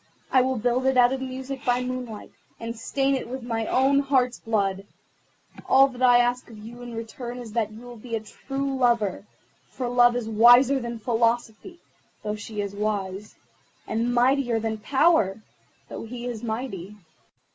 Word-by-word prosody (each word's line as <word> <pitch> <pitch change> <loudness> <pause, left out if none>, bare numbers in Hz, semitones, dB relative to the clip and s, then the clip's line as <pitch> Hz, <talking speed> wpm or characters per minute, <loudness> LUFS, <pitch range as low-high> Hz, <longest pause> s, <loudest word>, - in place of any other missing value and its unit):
I 260 - +5
will 260 +1 0
build 245 +3 0
it 265 -1 +2
out 245 +1 +5
of 265 - -4
music 265 +1 -6
by 250 -2 +1
moonlight, 250 -4 -6 0.3
and 230 0 -5
stain 270 +4 0
it 260 -3 -3
with 260 0 -6
my 225 -2 -2
own 270 +2 +3
heart's 260 -3 +1
blood. 200 -3 -1 0.8
All 270 +1 +7
that 255 -1 -11
I 245 -1 +6
ask 245 +1 +1
of 225 - -12
you 230 +3 -11
in 240 -1 -8
return 235 +2 -6
is 240 -3 -8
that 220 -1 -1
you 220 +2 -11
will 245 -1 -10
be 230 +1 -5
a - - -1
true 270 +5 -4
lover, 230 -6 +1 0.4
for 255 - -4
Love 240 0 +4
is 245 -3 -2
wiser 245 +5 +6
than 235 -1 -5
Philosophy, 235 - -1 0.4
though 210 0 -2
she 215 -1 -5
is 200 -1 -4
wise, 205 -1 -3 0.5
and 230 +2 -1
mightier 245 -1 +2
than 220 -1 -3
Power, 265 - +2 0.4
though - - -7
he 240 +1 -7
is 240 -3 -4
mighty. 220 -4 -5
240 Hz, 175 wpm, -25 LUFS, 220-255 Hz, 0.8 s, All